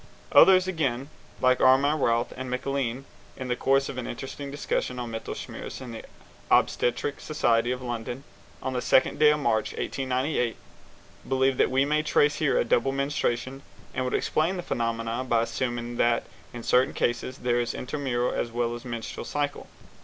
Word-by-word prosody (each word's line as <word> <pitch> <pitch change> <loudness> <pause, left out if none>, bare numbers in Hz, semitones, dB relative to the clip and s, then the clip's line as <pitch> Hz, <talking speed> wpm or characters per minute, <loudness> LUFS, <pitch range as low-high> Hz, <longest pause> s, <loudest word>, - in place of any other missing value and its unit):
Others 185 -1 +7
again, 140 -6 -1 0.3
like 130 0 +3
Armand 140 +3 +4
Routh 115 -1 +1
and 130 0 -5
MacLean, 130 0 -2 0.3
in 130 -1 -5
the 125 - +1
course 135 +2 +2
of 130 - -5
an 125 - -5
interesting 140 +3 -6
discussion 140 -3 -2
on 120 -2 -4
Mittelschmerz 115 0 -6
at 130 -3 -8
the 115 - -7 0.5
Obstetric 140 +4 +2
Society 120 -6 +1
of 125 0 -3
London, 120 +2 -4 0.4
on 130 - -2
the 125 - -1
second 130 - +3
day 150 -1 +7
of 150 0 +2
March, 110 -6 +1
1898, 130 -2 -1 0.7
believe 130 0 +2
that - - +3
we 135 +2 +2
may 150 +1 +2
trace 145 -1 +2
here 150 -3 +2
a - - +2
double 120 +3 +2
menstruation, 135 -1 -1 0.3
and 130 - -1
would 125 - -1
explain 165 +5 0
the 175 - -4
phenomenon 115 0 -2
by 115 -2 +3
assuming 120 0 -3
that 120 0 +2 0.3
in 120 -1 -8
certain 125 +3 +3
cases 120 +2 -1
there 120 -2 +1
is 120 - -2
an - - -5
intermenstrual 125 -3 -1
as 120 - -1
well 120 0 -1
as 120 - -7
a - - -9
menstrual 115 -2 -5
cycle. 145 -1 -3
130 Hz, 175 wpm, -27 LUFS, 120-140 Hz, 0.7 s, Others